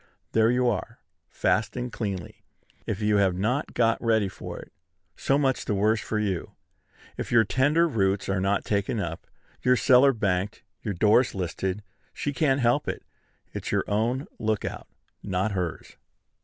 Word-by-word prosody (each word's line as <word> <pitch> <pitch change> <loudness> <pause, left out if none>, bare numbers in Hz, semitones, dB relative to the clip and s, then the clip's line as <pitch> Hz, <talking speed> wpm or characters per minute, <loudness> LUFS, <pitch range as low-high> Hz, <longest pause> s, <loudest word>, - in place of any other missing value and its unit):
There 110 0 +4
you 125 +1 +2
are 115 +1 -2 0.3
fast 100 +7 0
and 125 -1 -4
cleanly. 100 -6 -5 0.5
If 105 0 -2
you 105 0 +3
have 95 -3 +3
not 115 +10 -1
got 115 0 +2
ready 110 -4 +2
for - - -8
it, - - -12 0.4
so 135 - +1
much 135 -3 +1
the 105 - 0
worse 110 +2 +2
for 110 - -3
you! 100 -5 -2 0.6
If - - -5
your 115 -2 +6
tender 145 +9 +2
roots 100 - 0
are 95 -1 0
not 100 +1 0
taken 100 +2 0
up, 85 -4 -5 0.3
your 125 0 +4
cellar 130 +3 +5
banked, 100 -3 -1 0.2
your 105 -4 -3
doors 110 +7 +3
listed, 95 +2 -3 0.3
she 145 - -2
can't 135 -1 +2
help 120 +5 +2
it: - - -4 0.5
it's - - -4
your - - +1
own 115 +6 0
lookout, 110 -1 -2 0.3
not 95 +2 -1
hers. 90 -4 -4
110 Hz, 160 wpm, -26 LUFS, 95-125 Hz, 0.6 s, your